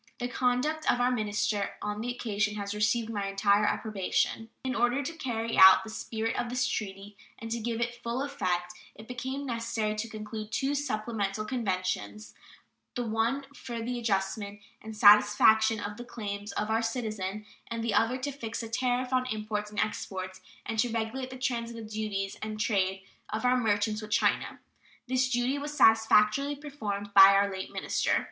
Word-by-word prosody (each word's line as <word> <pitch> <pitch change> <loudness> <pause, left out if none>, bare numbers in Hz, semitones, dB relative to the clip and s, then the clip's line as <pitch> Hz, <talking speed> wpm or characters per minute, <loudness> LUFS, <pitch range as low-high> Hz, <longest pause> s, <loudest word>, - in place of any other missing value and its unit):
The 245 - -2
conduct 255 +6 +1
of 245 - -1
our 245 +1 +3
minister 210 -3 -1
on 210 0 -4
the 240 - -3
occasion 215 -3 -1
has 200 -1 -4
received 215 +2 +1
my 200 -2 -2
entire 200 +1 +3
approbation. 215 +2 -1
In 260 -1 -1
order 240 +4 +1
to 330 - -4
carry 230 -7 -2
out 190 0 +9
the 220 - -8
spirit 225 0 -3
of 240 - -2
this 250 +1 0
treaty 200 -1 -5 0.2
and 225 0 -8
to 235 - -1
give 230 0 -2
it 240 0 -3
full 240 +3 -2
effect 185 -9 -2 0.2
it 220 +1 -12
became 260 +3 -4
necessary 230 -3 -2
to 215 +2 -4
conclude 215 0 -7
two 270 +4 0
supplemental 215 -6 -2
conventions, 185 - -3 0.6
the 245 - -1
one 225 +5 0
for 235 -4 -6
the 240 +2 -3
adjustment 200 -1 -2 0.2
and 220 0 -9
satisfaction 210 +1 +6
of 205 0 -5
the 240 - -7
claims 205 -3 -6
of 210 +1 -2
our 225 +1 +2
citizens 215 -3 -3 0.2
and 230 0 -4
the 230 -2 0
other 225 +5 +2
to 275 +2 -3
fix 230 -5 -5
the 225 - -6
tariff 250 +2 0
on 255 0 +2
imports 215 -2 -3
and 210 -1 -5
exports 185 -3 -3 0.2
and 225 - -3
to 245 - +3
regulate 230 +3 -3
the 260 - -8
transit 235 -3 -3
duties 210 -2 -3
and 215 0 -5
trade 195 -2 0 0.3
of 220 +3 -3
our 250 0 +4
merchants 215 -2 +1
with 215 - -8
China. 215 - +1 0.5
This 255 +1 +1
duty 255 +3 0
was 295 +1 -6
satisfactorily 225 +5 +4
performed 210 -9 -5
by 195 0 +10
our 200 0 +3
late 190 0 -6
minister. - - 0
220 Hz, 175 wpm, -29 LUFS, 210-245 Hz, 0.6 s, by